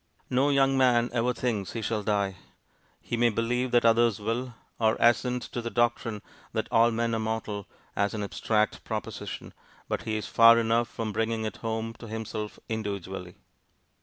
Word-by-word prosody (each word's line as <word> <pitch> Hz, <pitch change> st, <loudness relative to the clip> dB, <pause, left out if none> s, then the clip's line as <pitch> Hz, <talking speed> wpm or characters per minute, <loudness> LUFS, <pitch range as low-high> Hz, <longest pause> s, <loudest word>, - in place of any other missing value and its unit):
No 130 Hz, +3 st, +3 dB
young 135 Hz, -1 st, +3 dB
man 120 Hz, -2 st, +4 dB
ever 120 Hz, +1 st, +2 dB
thinks 115 Hz, -6 st, -2 dB
he 115 Hz, -, -4 dB
shall 110 Hz, 0 st, -1 dB
die. 100 Hz, -2 st, 0 dB, 0.6 s
He -, -, -3 dB
may 120 Hz, 0 st, +4 dB
believe 120 Hz, +3 st, 0 dB
that 120 Hz, -1 st, +3 dB
others 115 Hz, -2 st, +4 dB
will, 115 Hz, +3 st, -3 dB, 0.2 s
or 110 Hz, -1 st, +3 dB
assent 125 Hz, +1 st, +3 dB
to 120 Hz, -, -2 dB
the 115 Hz, -, -3 dB
doctrine 115 Hz, -3 st, 0 dB, 0.3 s
that 110 Hz, -1 st, -1 dB
'all 115 Hz, +1 st, +5 dB
men 115 Hz, 0 st, -1 dB
are 115 Hz, -, 0 dB
mortal' 110 Hz, -2 st, -3 dB, 0.3 s
as 100 Hz, +2 st, 0 dB
an 105 Hz, -, -2 dB
abstract 105 Hz, +1 st, 0 dB
proposition, -, -, -5 dB, 0.3 s
but -, -, -2 dB
he 110 Hz, -1 st, -2 dB
is 105 Hz, -, -4 dB
far 115 Hz, 0 st, +7 dB
enough 115 Hz, +1 st, +2 dB
from 110 Hz, -1 st, -4 dB
bringing 115 Hz, +1 st, -1 dB
it 110 Hz, -, -4 dB
home 115 Hz, 0 st, -3 dB
to 115 Hz, -, -9 dB
himself 110 Hz, -1 st, -5 dB
individually. 95 Hz, -5 st, -4 dB
115 Hz, 170 wpm, -28 LUFS, 110-120 Hz, 0.6 s, far